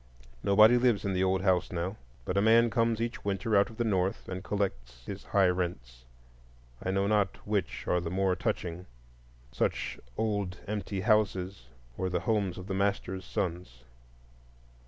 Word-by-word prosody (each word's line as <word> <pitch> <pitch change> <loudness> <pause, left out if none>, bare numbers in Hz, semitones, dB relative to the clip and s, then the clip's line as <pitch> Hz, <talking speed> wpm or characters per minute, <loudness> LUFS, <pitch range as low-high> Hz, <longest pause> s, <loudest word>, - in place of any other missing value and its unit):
Nobody 110 +4 +6
lives 120 -5 +2
in 100 - 0
the 90 0 +1
old 95 0 +1
house 95 -2 +2
now, 90 +3 -2 0.3
but 90 - -2
a 100 - +3
man 115 +2 +5
comes 115 0 +1
each 115 +1 -3
winter 100 +2 0
out 100 +3 +4
of 110 - -13
the 120 - +1
North 95 -4 0
and 95 0 -5
collects 60 -14 -3
his - - -7
high 100 -1 +3
rents. 65 -10 -3 0.8
I - - -3
know 95 +1 +1
not 105 -1 +1
which 105 -3 -2
are 90 - +2
the 85 - -4
more 95 +1 +1
touching,—such - - -4 0.2
old 100 -4 -1
empty 100 -2 -3
houses, 100 - +1 0.3
or 95 - 0
the 90 -1 -1
homes 100 -3 0
of 90 - -7
the 95 - -4
masters' 95 -1 -1
sons. 85 -9 -4
95 Hz, 160 wpm, -30 LUFS, 90-105 Hz, 0.8 s, Nobody